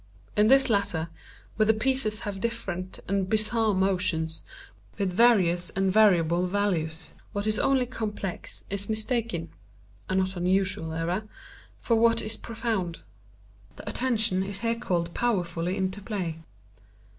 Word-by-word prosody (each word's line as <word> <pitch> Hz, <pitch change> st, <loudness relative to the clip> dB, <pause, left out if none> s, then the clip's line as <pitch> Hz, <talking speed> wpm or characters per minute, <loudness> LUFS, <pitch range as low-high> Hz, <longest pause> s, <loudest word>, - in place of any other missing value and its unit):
In 210 Hz, +1 st, +5 dB
this 270 Hz, +2 st, +6 dB
latter, 200 Hz, -7 st, +1 dB, 0.5 s
where 215 Hz, -1 st, +3 dB
the 220 Hz, -, +5 dB
pieces 220 Hz, -2 st, 0 dB
have 200 Hz, -2 st, -5 dB
different 195 Hz, -6 st, -4 dB
and 195 Hz, -1 st, 0 dB
bizarre 215 Hz, 0 st, +2 dB
motions, 180 Hz, -4 st, 0 dB, 0.5 s
with 195 Hz, -3 st, -1 dB
various 180 Hz, -6 st, +4 dB
and 195 Hz, 0 st, +2 dB
variable 180 Hz, -4 st, +4 dB
values, 180 Hz, -5 st, 0 dB, 0.2 s
what 205 Hz, 0 st, -1 dB
is 215 Hz, -1 st, +2 dB
only 270 Hz, -2 st, +3 dB
complex 210 Hz, -6 st, -5 dB
is 200 Hz, +1 st, -3 dB
mistaken 220 Hz, -6 st, -2 dB, 0.6 s
(a 185 Hz, -, 0 dB
not 190 Hz, 0 st, +1 dB
unusual 185 Hz, -1 st, 0 dB
error) 175 Hz, +6 st, -2 dB, 0.5 s
for 230 Hz, -, +1 dB
what 230 Hz, 0 st, +4 dB
is 215 Hz, +1 st, 0 dB
profound. 220 Hz, -7 st, -3 dB, 0.7 s
The -, -, -12 dB
attention 220 Hz, -6 st, 0 dB
is 195 Hz, +1 st, -4 dB
here 230 Hz, 0 st, +1 dB
called 170 Hz, -7 st, -2 dB
powerfully 180 Hz, -6 st, -1 dB
into 190 Hz, +1 st, -2 dB
play. 185 Hz, -7 st, -3 dB
200 Hz, 135 wpm, -27 LUFS, 180-220 Hz, 0.7 s, this